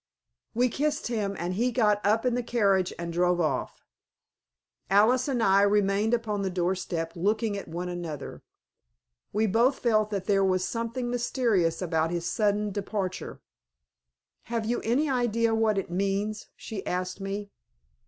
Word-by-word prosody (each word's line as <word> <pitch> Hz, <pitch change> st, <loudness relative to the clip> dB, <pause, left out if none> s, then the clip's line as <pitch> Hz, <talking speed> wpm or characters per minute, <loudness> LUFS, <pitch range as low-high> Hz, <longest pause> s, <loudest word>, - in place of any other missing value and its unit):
We 245 Hz, +2 st, +3 dB
kissed 295 Hz, +2 st, -1 dB
him, 205 Hz, -4 st, -1 dB
and 175 Hz, +2 st, -2 dB
he 240 Hz, +6 st, +1 dB
got 210 Hz, -4 st, +2 dB
up 220 Hz, +4 st, +2 dB
in 250 Hz, -, +2 dB
the 245 Hz, -, 0 dB
carriage 200 Hz, -6 st, +2 dB
and 170 Hz, 0 st, -5 dB
drove 175 Hz, +1 st, +2 dB
off. 150 Hz, -6 st, -2 dB, 1.1 s
Alice 225 Hz, +7 st, +4 dB
and 250 Hz, -5 st, 0 dB
I 195 Hz, 0 st, +5 dB
remained 205 Hz, +2 st, +3 dB
upon 215 Hz, -3 st, -2 dB
the 195 Hz, -, -1 dB
doorstep 175 Hz, -2 st, -2 dB
looking 210 Hz, +4 st, 0 dB
at 200 Hz, -, -6 dB
one 175 Hz, +2 st, -4 dB
another. 175 Hz, -4 st, -6 dB, 0.9 s
We 215 Hz, +2 st, +1 dB
both 235 Hz, +6 st, +3 dB
felt 215 Hz, -3 st, +2 dB
that 200 Hz, -3 st, -3 dB
there 195 Hz, -2 st, +3 dB
was 185 Hz, -1 st, +1 dB
something 235 Hz, +2 st, -3 dB
mysterious 230 Hz, -9 st, +1 dB
about 160 Hz, -2 st, 0 dB
his 170 Hz, 0 st, -3 dB
sudden 210 Hz, 0 st, +1 dB
departure. 195 Hz, -1 st, -4 dB, 1.0 s
"Have 230 Hz, -2 st, -2 dB
you 240 Hz, +2 st, 0 dB
any 255 Hz, +7 st, +1 dB
idea 230 Hz, -3 st, +1 dB
what 220 Hz, -2 st, +2 dB
it 190 Hz, -3 st, -3 dB
means?" 200 Hz, +3 st, -1 dB
she 205 Hz, -4 st, -7 dB
asked 185 Hz, +1 st, -3 dB
me. 200 Hz, +1 st, -4 dB
205 Hz, 155 wpm, -27 LUFS, 185-230 Hz, 1.1 s, I